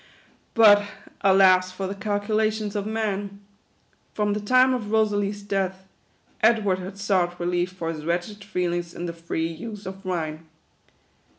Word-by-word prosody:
But 205 -3 +7 0.4
alas 190 -1 +5
for 190 +1 -5
the 190 - -3
calculations 215 +1 -1
of 205 0 -2
man! 205 -2 -3 0.8
From 210 -1 +1
the 210 - -1
time 255 +5 +4
of 225 -5 -3
Kosalie's 205 -2 +1
death, 190 -1 -2 0.5
Edward 215 -4 +3
had 190 +2 -8
sought 185 -3 0
relief 175 +1 0
for 165 -3 -3
his 155 -1 -8
wretched 175 +5 -3
feelings 175 -3 -2
in 175 - -5
the 170 - -4
free 165 -1 -3
use 205 +5 -8
of 190 +1 -8
wine. 160 -4 -4
195 Hz, 140 wpm, -24 LUFS, 180-210 Hz, 0.8 s, But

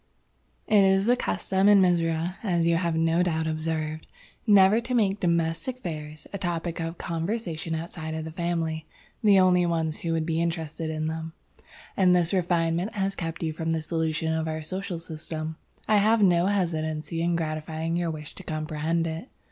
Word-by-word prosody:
"It 210 -2 +5
is 195 0 +4
the 245 +2 +4
custom 195 -4 +1
in 205 -1 +7
Mizora, 170 -1 +1
as 175 -6 +1
you 170 0 +3
have 170 -1 0
no 165 +1 +2
doubt 160 -3 0
observed, 155 0 -2 0.4
never 205 +2 +6
to 250 +2 -2
make 205 -3 +2
domestic 170 +8 0
affairs 155 - -6
a 200 - -3
topic 170 -1 -2
of 165 +1 -4
conversation 165 -1 -3
outside 160 -1 -5
of 160 0 -4
the 160 - -6
family, 165 -2 -2 0.4
the 200 -2 +6
only 180 -1 +5
ones 165 -2 -1
who 165 - -2
would 160 -1 0
be 165 0 0
interested 165 -1 -2
in 155 0 -2
them; 160 0 -4 0.6
and 180 -2 +5
this 175 +1 +2
refinement 175 +1 +1
has 195 -1 0
kept 165 0 -4
you 160 -1 -1
from 160 +1 -3
the 165 -1 0
solution 160 -1 -1
of 160 0 -1
our 155 0 -3
social 185 +2 -4
system. 160 -1 -6 0.3
I 215 - +4
have 215 +2 +4
no 175 -1 +4
hesitancy 165 -4 -1
in 170 0 +1
gratifying 160 0 -2
your 175 -1 0
wish 155 -2 -7
to 190 - -11
comprehend 155 +1 -1
it. 165 +9 -5
165 Hz, 180 wpm, -26 LUFS, 160-185 Hz, 0.6 s, in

